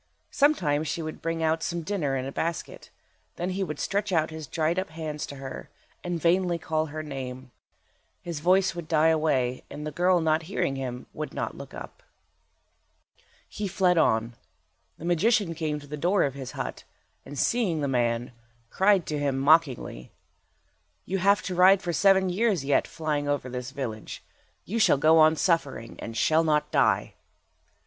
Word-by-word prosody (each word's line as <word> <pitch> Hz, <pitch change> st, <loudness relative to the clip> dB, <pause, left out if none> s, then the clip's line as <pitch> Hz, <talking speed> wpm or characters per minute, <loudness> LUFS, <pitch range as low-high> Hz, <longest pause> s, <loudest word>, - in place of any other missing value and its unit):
Sometimes 165 Hz, -, +2 dB
she 165 Hz, -, -3 dB
would 155 Hz, 0 st, -7 dB
bring 165 Hz, 0 st, -2 dB
out 160 Hz, 0 st, +1 dB
some 170 Hz, 0 st, -3 dB
dinner 155 Hz, -7 st, -1 dB
in 130 Hz, -, -3 dB
a 135 Hz, -, -5 dB
basket. 165 Hz, +3 st, -4 dB, 0.5 s
Then 180 Hz, +2 st, -3 dB
he 195 Hz, +1 st, -1 dB
would 150 Hz, -5 st, -4 dB
stretch 200 Hz, 0 st, -1 dB
out 160 Hz, -2 st, +1 dB
his 160 Hz, -2 st, -7 dB
dried 165 Hz, +4 st, 0 dB
up 190 Hz, -, -4 dB
hands 155 Hz, -2 st, -5 dB
to 140 Hz, -, -8 dB
her, 135 Hz, -1 st, -8 dB, 0.3 s
and 175 Hz, -1 st, -2 dB
vainly 175 Hz, +1 st, +2 dB
call 155 Hz, -1 st, -1 dB
her 155 Hz, +1 st, -6 dB
name. 130 Hz, -3 st, -7 dB, 0.7 s
His 170 Hz, -4 st, -5 dB
voice 185 Hz, +3 st, +3 dB
would 170 Hz, -2 st, -7 dB
die 160 Hz, -1 st, +3 dB
away, 140 Hz, -6 st, +1 dB
and 150 Hz, -, -7 dB
the 150 Hz, -, -4 dB
girl 180 Hz, +3 st, +3 dB
not 160 Hz, -1 st, +2 dB
hearing 140 Hz, -8 st, -1 dB
him 125 Hz, -2 st, -5 dB
would 155 Hz, 0 st, -6 dB
not -, -, -3 dB
look -, -, -10 dB
up. -, -, -10 dB, 1.5 s
He 210 Hz, -, -4 dB
fled 185 Hz, -1 st, +2 dB
on. 115 Hz, -4 st, +2 dB, 0.6 s
The 165 Hz, -, -9 dB
magician 185 Hz, +2 st, +2 dB
came 155 Hz, -2 st, -2 dB
to 145 Hz, -, -13 dB
the 150 Hz, +1 st, -6 dB
door 180 Hz, +6 st, +2 dB
of 135 Hz, -, -1 dB
his 135 Hz, -2 st, -7 dB
hut, -, -, -5 dB, 0.4 s
and 145 Hz, -, -9 dB
seeing 195 Hz, -, +1 dB
the 140 Hz, -, 0 dB
man, 120 Hz, -2 st, 0 dB, 0.4 s
cried 195 Hz, -2 st, +3 dB
to 150 Hz, -1 st, -3 dB
him, 140 Hz, -2 st, 0 dB
mockingly— 135 Hz, -, +2 dB, 0.9 s
"You 195 Hz, +1 st, -2 dB
have 200 Hz, +2 st, +3 dB
to 185 Hz, -, -3 dB
ride 185 Hz, +2 st, +5 dB
for 175 Hz, -, -2 dB
seven 190 Hz, +2 st, +4 dB
years 195 Hz, -6 st, +1 dB
yet, 140 Hz, 0 st, +2 dB
flying 150 Hz, -2 st, -2 dB
over 145 Hz, -3 st, -1 dB
this 125 Hz, 0 st, -5 dB
village. 130 Hz, -6 st, -6 dB, 0.4 s
You 230 Hz, +5 st, -2 dB
shall 215 Hz, -, +5 dB
go 160 Hz, +3 st, +5 dB
on 155 Hz, 0 st, +6 dB
suffering, 150 Hz, -9 st, -1 dB
and 115 Hz, 0 st, -6 dB
shall 160 Hz, +1 st, +3 dB
not 150 Hz, -2 st, +1 dB
die." -, -, +2 dB
160 Hz, 175 wpm, -26 LUFS, 140-180 Hz, 1.5 s, on